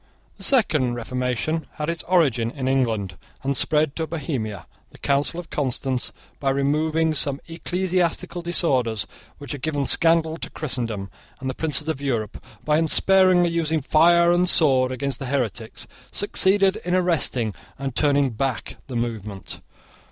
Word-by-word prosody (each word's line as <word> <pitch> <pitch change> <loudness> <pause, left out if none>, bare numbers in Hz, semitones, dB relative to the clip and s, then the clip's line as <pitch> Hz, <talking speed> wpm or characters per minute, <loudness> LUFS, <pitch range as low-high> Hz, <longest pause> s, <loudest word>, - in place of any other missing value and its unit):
The - - -6
second 150 - +3
reformation 125 +6 -2
had 150 - -4
its 170 -2 -2
origin 135 -11 +2
in 130 0 -4
England, 110 -9 0 0.3
and 140 +1 0
spread 150 +1 +1
to 160 -1 -2
Bohemia. 125 - -4 0.2
The - - -16
Council 140 +4 0
of 175 - -10
Constance, 130 -2 -1 0.3
by 135 - 0
removing 155 +4 +1
some 140 -2 +1
ecclesiastical 180 +1 -1
disorders 130 - +1 0.3
which 145 -3 -9
had 145 - -5
given 145 -1 -1
scandal 165 +1 +3
to - - -5
Christendom, 115 -9 -4 0.3
and 130 0 -3
the - - -7
princes 150 +1 0
of 155 -4 -2
Europe, 115 -7 -3 0.2
by 150 0 +3
unsparingly 180 +1 +4
using 160 -1 0
fire 170 +4 +4
and 175 +1 +3
sword 130 -7 +4
against 130 0 -3
the 135 - -5
heretics, 120 -4 -3 0.3
succeeded 195 -1 +2
in 180 +1 -2
arresting 150 - +1 0.2
and 135 -2 -4
turning 145 -3 +2
back 125 +1 -3
the 130 - -7
movement. 110 -5 -4
145 Hz, 145 wpm, -23 LUFS, 125-165 Hz, 0.3 s, unsparingly